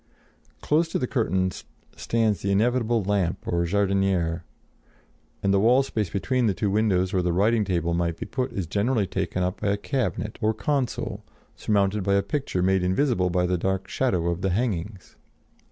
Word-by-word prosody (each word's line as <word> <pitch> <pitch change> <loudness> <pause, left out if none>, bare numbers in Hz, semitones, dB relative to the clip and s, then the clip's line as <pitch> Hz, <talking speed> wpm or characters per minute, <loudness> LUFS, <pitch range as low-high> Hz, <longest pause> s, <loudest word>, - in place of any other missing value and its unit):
Close 160 +3 +2
to - - -2
the 125 - -1
curtains 95 -8 -1 0.3
stands 110 -5 0
the 100 - -1
inevitable 115 +1 +2
lamp 95 -3 0
or 85 0 +1
jardinière, 95 -3 +1 1.0
and 100 - +2
the 100 - +4
wall 125 +6 +4
space 110 -8 -2
between 125 +6 0
the 100 - +1
two 100 0 -1
windows, 95 -3 +1
where 90 -2 +1
a 90 - +1
writing 105 +5 +2
table 85 -4 -1
might 85 -1 -1
be - - -5
put, 130 -1 -3
is 95 - -3
generally 105 +5 0
taken 90 0 -2
up 90 +1 -3
by 105 - -1
a 100 0 +1
cabinet 110 -2 -3
or 110 0 +1
console, 130 +3 -2 0.3
surmounted 100 -1 +1
by 100 +1 +2
a 100 - +2
picture 100 -4 -2
made 95 0 +2
invisible 95 +1 +1
by 90 +1 +1
the 90 0 0
dark 95 +1 -1
shadow 90 -10 0
of 85 +2 -4
the 95 - +1
hangings. 100 -2 -3
100 Hz, 180 wpm, -25 LUFS, 90-115 Hz, 1.0 s, the